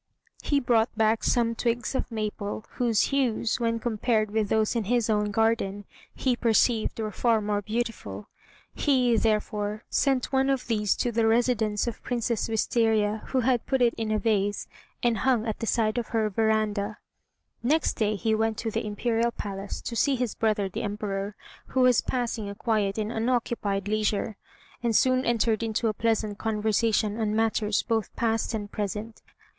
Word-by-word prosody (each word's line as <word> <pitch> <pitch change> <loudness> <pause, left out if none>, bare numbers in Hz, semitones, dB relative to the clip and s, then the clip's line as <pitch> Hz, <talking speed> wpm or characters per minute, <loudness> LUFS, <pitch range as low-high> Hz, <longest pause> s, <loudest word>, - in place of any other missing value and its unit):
He 285 - +1
brought 235 -3 +2
back 220 0 +2
some 230 -1 +2
twigs 235 +2 -1
of 260 - -2
maple, 215 -1 -4
whose 235 -3 +1
hues, 240 -4 +1
when 230 -1 0
compared 220 -1 0
with 215 -1 0
those 220 +1 +1
in 230 -3 0
his 235 0 +1
own 210 -1 +1
garden, 205 -2 0 0.3
he 255 -2 +1
perceived 230 -1 +2
were 215 -1 -2
far 230 +2 +2
more 205 -1 -1
beautiful. 230 +3 -4 0.5
He, 255 -5 +2
therefore, 210 -1 0
sent 270 -2 +1
one 265 0 +3
of 270 -2 0
these 210 -4 +1
to 245 - -1
the 225 0 +2
residence 225 -2 +2
of 235 - -5
Princess 235 -2 -1
Wistaria, 220 -1 +1
who 260 - +1
had 250 0 +2
it - - -34
put 265 - +1
in 230 -2 +1
a 215 - +2
vase, 205 -2 0 0.4
and 235 -2 +2
hung 250 -4 +2
at 220 -2 -3
the 230 - -3
side 220 0 +1
of 235 - -4
her 220 -2 0
veranda. 215 -1 0 0.6
Next 300 +6 +2
day 215 -1 0
he 220 +2 0
went 220 0 0
to 225 - -3
the - - -2
Imperial 225 +2 0
Palace, 200 -3 -6
to 235 - -5
see 275 +3 +2
his 250 -3 -2
brother 215 -3 0
the 190 - -5
Emperor, 205 -1 -3 0.3
who 260 - 0
was 250 -2 +5
passing 235 -4 -2
a 200 - -7
quiet 210 -3 0
and 215 0 -2
unoccupied 225 -4 -1
leisure, 215 0 0 0.5
and 235 -2 0
soon 255 +2 +3
entered 230 -2 +1
into 225 0 0
a - - -1
pleasant 215 -2 -1
conversation 220 0 +1
on 215 -1 0
matters 220 -1 +1
both 225 -3 -1
past 225 0 0
and 205 -2 -5
present. 210 +2 -4
225 Hz, 170 wpm, -27 LUFS, 210-235 Hz, 0.6 s, was